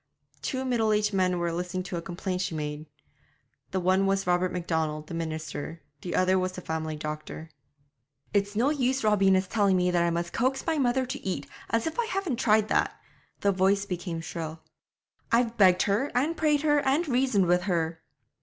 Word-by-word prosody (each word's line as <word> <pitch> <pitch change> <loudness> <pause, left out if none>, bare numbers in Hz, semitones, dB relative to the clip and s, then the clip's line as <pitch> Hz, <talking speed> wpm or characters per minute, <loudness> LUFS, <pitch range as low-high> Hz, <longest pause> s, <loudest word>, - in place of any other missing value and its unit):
Two 260 -1 -2
middle 225 -4 +2
aged 210 0 +1
men 185 -2 +2
were 170 -1 -1
listening 180 +2 -3
to 180 - -5
a 170 - -2
complaint 180 +2 -3
she 175 -3 -2
made; 150 0 -4 0.8
the 190 - -1
one 185 +2 +2
was 195 0 +1
Robert 180 +1 +2
Macdonald 160 -3 -2
the 170 - -9
minister, 160 -1 -5 0.2
the 175 - -4
other 185 +1 +3
was 185 0 -1
the 185 - -7
family 160 -1 -3
doctor. 155 +1 -6 0.8
'It's 200 0 +1
no 250 +7 +3
use 265 -3 0
Robina's 195 -3 +3
telling 200 -3 +2
me 180 0 +2
that 175 -1 +2
I 170 - +2
must 170 0 -2
coax 260 +3 0
my 320 -2 0
mother 260 0 +2
to 260 +2 -6
eat, 180 -7 -3 0.2
as 230 0 +1
if 320 +7 -3
I 475 - +2
hadn't 375 - -2
tried 215 -3 +3
that' - - +1 0.4
the 200 - +3
voice 195 +1 +2
became 175 -3 -4
shrill 160 -1 -6 0.7
'I've 235 0 +2
begged 185 -4 +5
her, 210 +8 +1
and 295 +7 +1
prayed 300 -2 +2
her, 295 -1 +4
and 285 +5 +1
reasoned 250 -7 +2
with 180 +1 +3
her.' 165 -2 -1
190 Hz, 190 wpm, -27 LUFS, 170-240 Hz, 0.8 s, begged